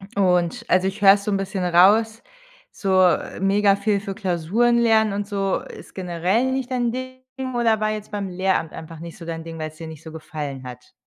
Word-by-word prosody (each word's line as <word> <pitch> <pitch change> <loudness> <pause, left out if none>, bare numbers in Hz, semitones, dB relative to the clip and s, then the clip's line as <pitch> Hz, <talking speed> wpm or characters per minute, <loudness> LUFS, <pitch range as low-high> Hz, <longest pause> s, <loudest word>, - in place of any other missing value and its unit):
Und 185 +4 +1
also 185 +1 +3
ich 195 +2 -5
höre 195 -1 +9
es 200 0 -2
so 210 - -2
'n 195 - +1
bisschen 195 -1 -3
raus, 210 +6 +4 0.5
so, 190 -2 +1
äh, 180 -2 +1
mega 195 +1 +3
viel 200 0 0
für 200 -1 -5
Klausuren 210 +5 +1
lernen 220 -3 +3
und 205 0 -3
so, 195 -2 -1
ist - - -12
generell 185 +7 0
nicht 260 -1 -2
dein 245 -2 0
Ding 255 +1 -7 0.3
oder 230 -2 +2
war 215 0 0
jetzt 215 0 -6
beim 200 -2 -3
Lehramt 185 -2 -1
einfach 160 0 -9
nicht 170 +4 -9
so 170 - -10
dein 165 -1 -5
Ding, 165 0 -8
weil's 155 0 -6
dir 165 - -8
nicht 160 -1 -11
so 160 - -9
gefallen 150 -4 -6
hat? 125 -1 -11
195 Hz, 210 wpm, -22 LUFS, 170-215 Hz, 0.5 s, höre